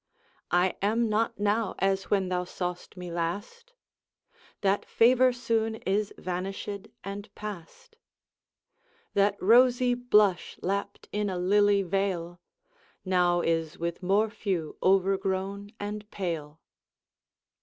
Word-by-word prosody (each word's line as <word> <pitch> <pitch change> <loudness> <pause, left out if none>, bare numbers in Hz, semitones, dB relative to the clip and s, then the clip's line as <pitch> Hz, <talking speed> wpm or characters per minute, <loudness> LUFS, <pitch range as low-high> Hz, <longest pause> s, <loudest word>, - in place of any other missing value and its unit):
I 180 +2 +2
am 225 +3 +1
not 215 0 0
now 205 0 +1
as 195 0 +1
when 195 -3 +1
thou 180 -1 0
saw'st 180 +1 -5
me 180 -1 -6
last, 205 - -4 0.9
That 200 0 +2
favour 255 +2 +4
soon 230 -2 -1
is 205 0 -1
vanished 195 +2 -4 0.2
and 200 +1 -6
past; 210 - -9 1.2
That 200 0 +3
rosy 245 +4 +5
blush 210 -6 +2
lapt 200 +2 -3
in 210 -1 -1
a 185 - -3
lily 200 +2 +3
vale, 180 -2 -2 0.7
Now 180 -1 +3
is 165 0 -1
with 170 +1 -3
morphew 195 -3 0
overgrown 195 +1 +1
and 210 +1 -5
pale. 160 -7 -4
195 Hz, 110 wpm, -28 LUFS, 180-210 Hz, 1.2 s, rosy